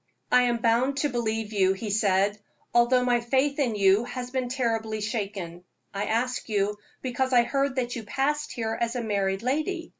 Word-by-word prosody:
"I 250 - +6
am 240 -1 +1
bound 240 +4 +2
to 290 +1 +1
believe 225 -3 -2
you," 190 -2 +3
he 205 +2 -5
said, 200 0 +2 0.3
"although 250 +1 +4
my 245 -1 +3
faith 270 +4 +1
in 245 -6 +1
you 200 +2 +4
has 250 0 -6
been 255 -2 -2
terribly 225 -4 -1
shaken. 200 -6 -4 0.3
I 200 +1 -2
ask 245 +3 -1
you 205 0 0 0.2
because 260 +1 -1
I 240 -1 +6
heard 275 +1 0
that 245 -2 -2
you 235 - -4
passed 285 +7 -1
here 225 -1 -2
as 235 +1 0
a 245 - -2
married 200 -2 -1
lady. 310 +7 -1
235 Hz, 185 wpm, -26 LUFS, 210-255 Hz, 0.3 s, I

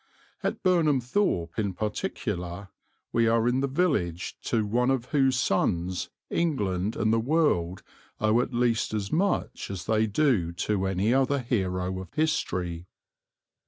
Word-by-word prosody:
At - - -2
Burnham 165 -7 +3
Thorpe 120 - 0
in 100 -4 -1
particular 100 - -3 0.4
we 115 0 +3
are 115 0 +3
in 125 +2 +2
the 140 - +1
village 130 - 0
to 110 -2 +1
one 120 +5 +1
of 130 -3 +1
whose 135 -3 +3
sons 90 -5 0 0.2
England 105 - 0
and 110 +1 +1
the 115 - +3
world 115 - +1 0.4
owe 110 +3 +3
at 125 - -3
least 120 -3 +1
as 100 -2 -3
much 195 +5 0
as 95 -3 -5
they 110 0 +2
do 105 - +1
to 95 +2 -1
any 95 +5 +1
other 135 +1 +2
hero 95 -7 -1
of 90 - -11
history. 90 - -1
110 Hz, 145 wpm, -27 LUFS, 95-135 Hz, 0.4 s, Burnham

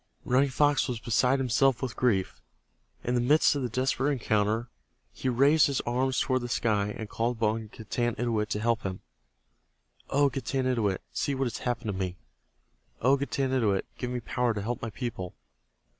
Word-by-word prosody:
Running 135 +3 +3
Fox 145 +3 +2
was 125 -3 -3
beside 125 +3 +2
himself 130 0 +2
with 130 -4 -4
grief. 100 -7 0 0.6
In 125 - -1
the 120 - +2
midst 150 +7 +4
of 140 - -1
the 125 - -2
desperate 130 +3 0
encounter 110 -2 0 0.5
be 130 - +1
raised 140 +5 +5
his 140 -2 -1
arms 130 +2 0
toward 130 -1 +1
the 120 - -5
sky 105 -4 +1
and 110 - -5
called 115 +3 -1
upon 110 0 0
Getanittowit 115 0 -2
to 105 - -1
help 115 +1 +1
him. 95 -1 -5 1.1
"O 140 +1 +4
Getanittowit, 125 -6 -1
see 140 - -1
what 135 0 0
has 120 - -3
happened 120 -3 -2
to - - -1
me. 95 -1 -3 0.8
O 130 +4 +4
Getanittowit, 130 -7 0
give 125 - -3
me 125 -1 -3
power 120 0 0
to 105 - -2
help 120 +3 -3
my 115 - -3
people. 105 -5 -5
120 Hz, 170 wpm, -28 LUFS, 110-130 Hz, 1.1 s, raised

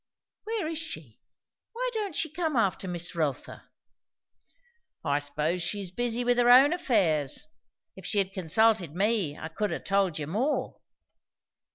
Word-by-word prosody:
"Where 440 -6 -2
is 320 -1 -3
she? 155 - -7 0.5
Why - - -2
don't 415 -7 -3
she 320 - 0
come 320 -2 -2
after 200 -4 +1
Miss 175 -1 -3
Rotha?" 155 -5 -3 1.4
"I 145 -1 +2
s'pose 150 +4 -1
she's 190 +1 -2
busy 240 +3 -1
with 245 0 +2
her 240 0 +4
own 270 +5 +8
affairs. 190 - +1 0.5
If - - -9
she' 210 - 0
had 195 -1 +1
consulted 190 -2 +2
me, 195 -6 +1
I 160 - -6
could 205 +6 -2
ha' - - -4
told 195 -4 +1
you 150 - -3
more." 225 - -1
200 Hz, 150 wpm, -28 LUFS, 165-255 Hz, 1.4 s, own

